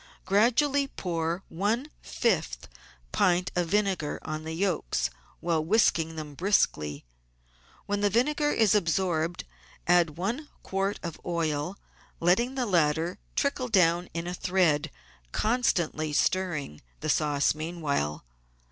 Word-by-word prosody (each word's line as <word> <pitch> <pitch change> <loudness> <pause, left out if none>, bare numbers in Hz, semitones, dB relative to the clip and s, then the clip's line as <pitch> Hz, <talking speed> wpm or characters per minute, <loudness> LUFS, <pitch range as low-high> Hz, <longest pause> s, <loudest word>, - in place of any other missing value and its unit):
Gradually 265 +8 +3
pour 170 -5 -3
one 220 - -1
fifth 160 - -1 0.4
pint 180 - +2
of 175 -1 +1
vinegar 195 -5 0
on 155 0 -5
the 160 - -4
yolks 165 - 0 0.3
while 165 -2 +1
whisking 165 -4 +2
them 155 -2 -6
briskly. 75 - +1 0.8
When 205 0 -1
the 205 - +3
vinegar 295 +8 +2
is 215 -3 +3
absorbed 170 -3 0 0.4
add 170 -3 +3
one 235 - -3
quart 195 +1 -1
of 170 -3 -6
oil, 165 +1 -1 0.4
letting 235 +10 +2
the 255 -2 0
latter 165 -3 +1 0.2
trickle 280 -2 0
down 175 -5 +3
in 170 0 -2
a 175 - -3
thread, 170 -4 +1 0.4
constantly 175 - 0
stirring 155 - 0 0.2
the - - -3
sauce 145 -2 +2
meanwhile. 150 - -2
175 Hz, 120 wpm, -28 LUFS, 155-205 Hz, 0.8 s, Gradually